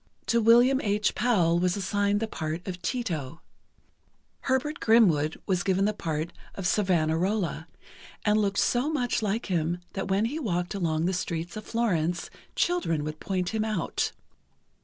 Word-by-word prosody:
To 235 Hz, 0 st, +2 dB
William 240 Hz, +4 st, +5 dB
H. 210 Hz, 0 st, +1 dB
Powell 180 Hz, -8 st, +2 dB
was 180 Hz, +2 st, +1 dB
assigned 205 Hz, +1 st, 0 dB
the 225 Hz, -, 0 dB
part 160 Hz, -2 st, -4 dB
of 180 Hz, -1 st, -5 dB
Tito; 165 Hz, -, -3 dB, 1.0 s
Herbert 275 Hz, +4 st, -1 dB
Grimwood 170 Hz, -10 st, +4 dB
was 185 Hz, -2 st, +1 dB
given 190 Hz, +2 st, +1 dB
the 210 Hz, -, +1 dB
part 160 Hz, -4 st, -3 dB, 0.2 s
of 195 Hz, -, -5 dB
Savonarola, 175 Hz, -1 st, +1 dB, 0.6 s
and 210 Hz, 0 st, +4 dB
looked 200 Hz, -1 st, 0 dB
so 250 Hz, +5 st, +2 dB
much 245 Hz, -6 st, 0 dB
like 215 Hz, +2 st, -1 dB
him 175 Hz, -2 st, 0 dB, 0.2 s
that 195 Hz, -, -3 dB
when 195 Hz, +3 st, +2 dB
he 285 Hz, +7 st, -2 dB
walked 180 Hz, -, -2 dB
along 165 Hz, -4 st, 0 dB
the 185 Hz, -, +1 dB
streets 170 Hz, -1 st, -3 dB
of 215 Hz, -, -7 dB
Florence, 175 Hz, -7 st, -1 dB, 0.2 s
children 255 Hz, -, +1 dB
would 155 Hz, +1 st, -5 dB
point 185 Hz, -2 st, -2 dB
him 220 Hz, -1 st, -1 dB
out. 215 Hz, -6 st, -1 dB
195 Hz, 155 wpm, -27 LUFS, 170-220 Hz, 1.0 s, William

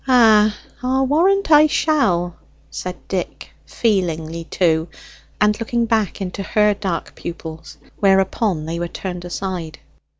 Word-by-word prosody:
"Ah, 215 Hz, -4 st, +5 dB, 0.2 s
I'll 260 Hz, +1 st, +1 dB
warrant 350 Hz, +6 st, +2 dB
I 300 Hz, 0 st, +8 dB
shall," 180 Hz, -, +1 dB, 0.4 s
said 180 Hz, -, -7 dB
Dick, 185 Hz, -2 st, -4 dB, 0.2 s
feelingly 170 Hz, -6 st, -1 dB
too, 165 Hz, -2 st, +1 dB, 0.5 s
and 210 Hz, +1 st, +2 dB
looking 235 Hz, +1 st, 0 dB
back 220 Hz, -4 st, 0 dB
into 190 Hz, +1 st, -4 dB
her 210 Hz, +1 st, +2 dB
dark 195 Hz, -4 st, -4 dB
pupils, 160 Hz, -1 st, -8 dB, 0.2 s
whereupon 195 Hz, -3 st, +2 dB
they 165 Hz, +1 st, -4 dB
were 175 Hz, -, -2 dB
turned 180 Hz, 0 st, -6 dB
aside. 175 Hz, -3 st, -5 dB
195 Hz, 125 wpm, -20 LUFS, 175-230 Hz, 0.5 s, I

